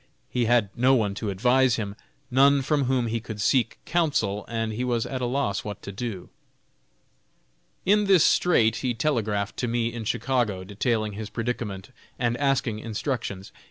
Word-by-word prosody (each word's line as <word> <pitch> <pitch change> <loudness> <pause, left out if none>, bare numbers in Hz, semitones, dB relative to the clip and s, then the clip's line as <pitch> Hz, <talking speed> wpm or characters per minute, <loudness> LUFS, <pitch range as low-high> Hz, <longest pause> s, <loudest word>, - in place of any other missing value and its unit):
He 125 -2 +1
had 115 -4 +3
no 130 +3 +4
one 105 -5 +1
to 105 +1 -4
advise 125 +5 +3
him; 100 -3 -4 0.4
none 140 +2 +5
from 145 0 +1
whom 125 -1 +1
he 115 0 -1
could 110 -2 -8
seek 120 +3 +2
counsel, 125 - 0
and 115 -1 -2
he 120 +4 -2
was 120 -2 0
at 130 -1 -4
a 125 - 0
loss 125 -6 -1
what 105 -1 -7
to 100 - -6
do. 100 -2 -6 1.5
In 210 +2 +4
this 190 -5 +5
strait 115 -11 +3
he 125 -3 -1
telegraphed 110 -7 -1
to 125 - -1
me, 115 0 -1
in 120 -1 -5
Chicago, 115 -5 0
detailing 110 +2 -1
his 105 0 -6
predicament, 115 -3 -4 0.3
and 120 -1 0
asking 135 -6 0
instructions. 110 -3 -4
115 Hz, 165 wpm, -25 LUFS, 105-130 Hz, 1.5 s, none